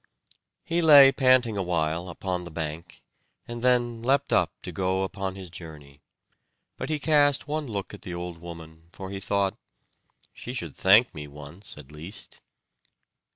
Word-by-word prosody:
He 170 +1 0
lay 145 -4 +9
panting 130 -5 +3
awhile 85 -1 -1
upon 90 0 -3
the 85 - -8
bank, 80 +2 -6 0.4
and 120 0 -6
then 120 -2 +2
leapt 135 +4 +1
up - - +3
to - - -6
go 95 0 0
upon 95 0 -4
his 95 -3 -9
journey; 75 -4 -11 0.7
but - - -5
he 155 - 0
cast 145 -1 +3
one 150 0 -3
look 100 -4 -5
at 100 - -10
the 90 - -6
old 85 -1 -6
woman, 80 -1 -11
for 95 +1 -8
he 100 - -4
thought, 100 0 0 0.8
"She 125 - -8
should 125 - -5
thank 105 +6 +5
me 75 -1 -7
once 75 +7 -11
at 75 -1 -11
least." 85 +7 -8
95 Hz, 155 wpm, -26 LUFS, 85-120 Hz, 0.8 s, lay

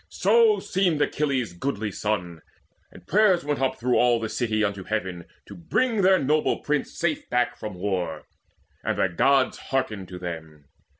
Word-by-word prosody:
So 455 -3 +4
seemed 180 -5 0
Achilles' 135 -9 -1
goodly 105 +1 -3
son; 90 -6 -3 0.5
and - - -15
prayers 200 -4 +3
Went 145 -2 -1
up 130 - 0
through 125 +1 +1
all 120 -1 +4
the 110 -1 -3
city 110 -1 0
unto 100 -2 -2
Heaven 95 -5 -3 0.2
To - - -11
bring 220 +6 0
their 190 0 +5
noble 150 +1 +1
prince 150 -1 -1
safe 165 -3 -1
back 125 0 +1
from 105 -5 -7
war; 90 -4 -3 0.6
And - - -1
the 95 - +2
Gods 130 +9 +2
hearkened 110 -8 -2
to 90 0 -8
them. 80 -4 -8
120 Hz, 165 wpm, -25 LUFS, 95-150 Hz, 0.6 s, their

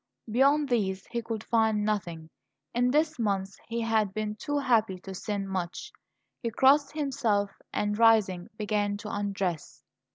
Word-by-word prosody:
Beyond 280 +5 +4
these 195 -6 0
he 235 -1 -1
could 225 -1 -5
find 220 -3 +2
nothing; 170 -7 -3 0.4
in 245 +1 +2
this 305 +2 +1
month 195 -3 -1
he 235 0 -2
had 220 -3 +1
been 215 -1 -2
too 290 +7 -3
happy 225 -8 +2
to 190 - -8
sin 200 +1 -3
much. 190 - -4 0.5
He 235 - -1
crossed 275 +5 +4
himself, 230 -9 0 0.2
and, 210 0 -1
rising, 215 -6 +4
began 205 -1 0
to 210 +1 -7
undress. 195 -5 -3
215 Hz, 150 wpm, -28 LUFS, 195-240 Hz, 0.5 s, Beyond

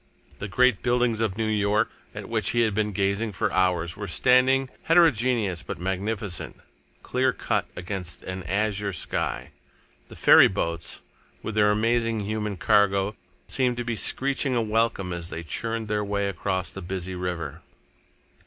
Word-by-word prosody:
The 100 - -4
great 125 +2 +3
buildings 120 -2 +1
of 110 -3 -1
New 110 - 0
York, 105 +1 +1 0.2
at - - -7
which - - 0
he 120 - +2
had 110 -3 +2
been 105 0 0
gazing 100 +2 -1
for - - -1
hours, 90 -2 +1
were 105 0 -6
standing, 130 +6 +3
heterogeneous 125 - +3
but - - -6
magnificent, 95 +1 -3 0.5
clear - - +1
cut - - -1
against 90 -1 -5
an 95 0 -5
azure 100 +2 -1
sky. 65 -6 -3 0.6
The - - -12
ferry - - +7
boats, 85 -4 -3 0.4
with 110 - -4
their 105 -1 +4
amazing 115 +1 +1
human 105 -1 -3
cargo, 100 0 +2 0.3
seemed 125 -2 0
to 120 - -3
be 115 -1 -2
screeching 135 +3 +2
a 120 - +2
welcome 110 -4 0
as 85 -1 -5
they 85 - -6
churned 115 +6 -3
their 105 0 -1
way 100 0 -1
across 95 0 -2
the - - -8
busy 95 +1 -4
river. 90 -5 -4
105 Hz, 155 wpm, -25 LUFS, 95-115 Hz, 0.6 s, ferry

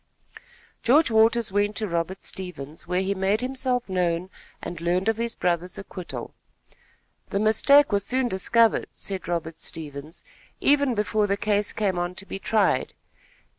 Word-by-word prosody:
George 275 +3 +4
Waters 225 0 +4
went 205 +1 +1
to 215 - -2
Robert 170 +2 -3
Stevens, 170 -5 -7
where 180 +1 +1
he 195 +1 0
made 195 +3 0
himself 255 -1 -1
known 180 -1 -1 0.3
and 170 -1 -7
learned 180 +3 0
of 225 -1 +2
his 235 0 -2
brother's 180 +1 -1
acquittal. 185 -2 -7 1.0
"The 200 - -1
mistake 280 +7 +5
was 200 -1 +1
soon 255 +4 0
discovered," 230 +2 +2
said 190 -3 -6
Robert 165 -2 -3
Stevens; 150 0 -8 0.4
"even 280 -3 +3
before 210 0 +1
the 200 0 0
case 205 -1 +1
came 195 -4 -1
on 175 +1 -3
to 190 - -5
be 195 - -6
tried. 215 +1 +1
200 Hz, 150 wpm, -25 LUFS, 180-225 Hz, 1.0 s, mistake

